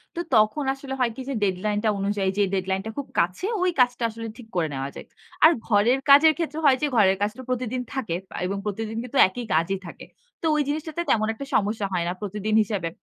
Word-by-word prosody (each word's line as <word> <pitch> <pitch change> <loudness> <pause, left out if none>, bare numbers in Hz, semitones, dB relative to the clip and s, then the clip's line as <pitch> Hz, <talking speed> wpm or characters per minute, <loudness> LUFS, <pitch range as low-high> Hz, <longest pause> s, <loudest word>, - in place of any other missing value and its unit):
তো - - -4 0.2
তখন 215 +7 +3
আসলে 270 0 -7
হয় 245 -2 +2
কি? 265 - -7
যে, - - -1
ডেডলাইন 205 +2 0
টা 220 - +3
অনুযায়ী 200 -1 0
যে 205 - +4
ডেডলাইন 190 0 -1
টা 220 - -4
খুব 280 - -4
কাছে, 180 - 0 0.2
ওই 365 - +3
কাজটা 245 -1 +3
আসলে 230 +1 -7
ঠিক 245 -3 -12
করে 170 -3 +1
নেওয়া 135 0 -3
যায়। - - -9 0.4
আর 315 - +9 0.2
ঘরের 225 +4 +3
কাজের 310 +3 +8
ক্ষেত্রে 320 -2 -3
হয় 270 -2 +6
যে, 300 - +2
ঘরের 195 -4 +4
কাজ 205 +1 +1
তো - - -7
প্রতিদিন 250 0 -2
থাকে 240 -11 -2
পা - - -11
এবং 195 +2 -2
প্রতিদিন 220 +2 -4
কিন্তু 250 +2 -5
একই 235 +6 -6
কাজই 165 +5 +1
থাকে। - - -10 0.4
তো - - -4
ওই 300 - +2
জিনিসটাতে 310 +3 -3
তেমন 215 -1 +2
একটা 250 +5 -7
সমস্যা 210 0 +1
হয় 175 -2 0
না, - - -1
প্রতিদিন 210 +1 -2
হিসেবে। 195 -5 -3
215 Hz, 225 wpm, -24 LUFS, 195-260 Hz, 0.4 s, আর